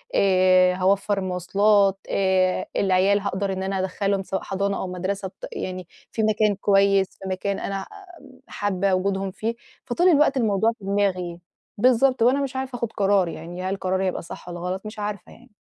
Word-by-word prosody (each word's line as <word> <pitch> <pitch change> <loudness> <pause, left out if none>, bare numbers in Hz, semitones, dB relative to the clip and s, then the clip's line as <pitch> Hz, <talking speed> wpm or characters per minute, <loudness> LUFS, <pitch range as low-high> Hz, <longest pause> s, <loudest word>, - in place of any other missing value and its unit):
آآ 185 -1 +4
هاوفّر 195 +2 +1
مواصلات، 195 +2 +2
آآ 190 -1 +1
العيال 195 +1 +3
هاقدر 195 -1 -2
إن 190 0 -4
أنا 195 0 -2
ادخلهم 195 +1 -1
سواء 190 0 -3
حضانة 200 +1 -1
أو - - -3
مدرسة، 190 +2 -3
ط - - -10
يعني 185 -1 -5 0.2
في 220 - -1
مكان 215 -1 +2
كويّس، 195 -1 +3 0.2
في 190 - -4
مكان 195 +1 -2
أنا 195 - -4
ع 195 - -5 0.6
حابة 195 -1 -1
وجودهم 195 +1 0
فيه. 225 +4 -3 0.3
فطول 345 +9 +2
الوقت 295 -4 +4
الموضوع 220 -2 +2
في 195 - -11
دماغي، 185 -4 -1 0.4
بالضبط، 255 +2 +3
وأنا 265 +4 +3
مش 265 -1 -5
عارفة 260 -1 -4
أخُد 235 -1 -3
قرار 195 -2 +2
يعني، 170 +3 -7
هل 190 +1 -1
قراري 190 +1 -1
هيبقى 185 - -2
صح 170 - -10
والّا 175 - -6
غلط، 185 +3 -4
مش 215 0 -8
عارفة 205 -2 -5
يعني. 250 +1 -18
195 Hz, 175 wpm, -23 LUFS, 185-210 Hz, 0.6 s, آآ